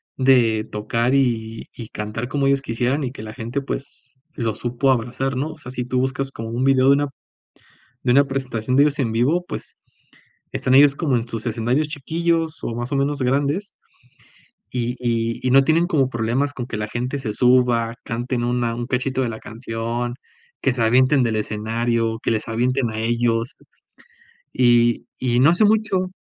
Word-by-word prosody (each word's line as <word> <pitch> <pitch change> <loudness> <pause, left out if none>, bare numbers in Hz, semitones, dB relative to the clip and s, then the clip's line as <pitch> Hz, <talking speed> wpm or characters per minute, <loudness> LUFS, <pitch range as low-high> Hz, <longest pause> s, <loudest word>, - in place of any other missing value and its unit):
de 120 -5 +3
tocar 115 +3 -1
y 115 -4 0
y 115 -3 -8
cantar 105 +3 -4
como 140 +1 0
ellos 140 0 +2
quisieran 125 +4 -1
y 125 - -3
que 110 - -9
la 110 0 -7
gente 120 +5 -4
pues 135 0 -6 0.2
los 115 -3 -2
supo 125 +3 +1
abrazar, 125 +2 -1
¿no? 145 +5 -2
O - - -17
sea, 135 -5 -9
si 125 -1 -3
tú 125 0 -1
buscas 135 +1 -1
como 115 -2 -7
un 120 +3 -2
video 135 -1 +4
de 140 - +8
una 145 +1 0 1.0
de 125 - +2
una 140 +2 +6
presentación 130 -3 -2
de 140 - +6
ellos 150 -1 0
en 120 -4 0
vivo, 145 +10 +1
pues, - - -6 0.8
están 130 - +1
ellos 140 0 +7
como 145 -6 +1
en 115 0 -3
sus 115 -2 -4
escenarios 120 +6 0
chiquillos 160 +2 -1
o 115 - -3
más 120 +2 -4
o - - +1
menos 140 +1 0
grandes, 145 +10 0 1.0
y 120 0 -2
y 115 -1 -1
y - - +2
no 135 +1 +7
tienen 160 +4 +3
como 140 -8 +2
problemas 120 +4 -1
con 125 -4 -5
que 120 -3 -5
la 105 0 -3
gente 125 +5 -3
se 115 -6 -3
suba, 125 -2 +3
canten 120 +1 -2
una 120 -1 0
un 120 +1 -4
cachito 130 +1 0
de 125 - 0
la 110 -1 -6
canción, 115 +1 -4 0.5
que 135 - +2
se 120 - -3
avienten 130 +4 +4
del 115 -2 0
escenario, 115 +2 -1
que - - -1
les 110 - -1
avienten 125 +2 0
a 110 - -6
ellos, 115 +1 0 1.0
y 120 -1 +3
y 120 -1 +1
no 140 +5 +6
hace 175 +5 +3
mucho 205 -4 +1
125 Hz, 185 wpm, -21 LUFS, 115-135 Hz, 1.0 s, de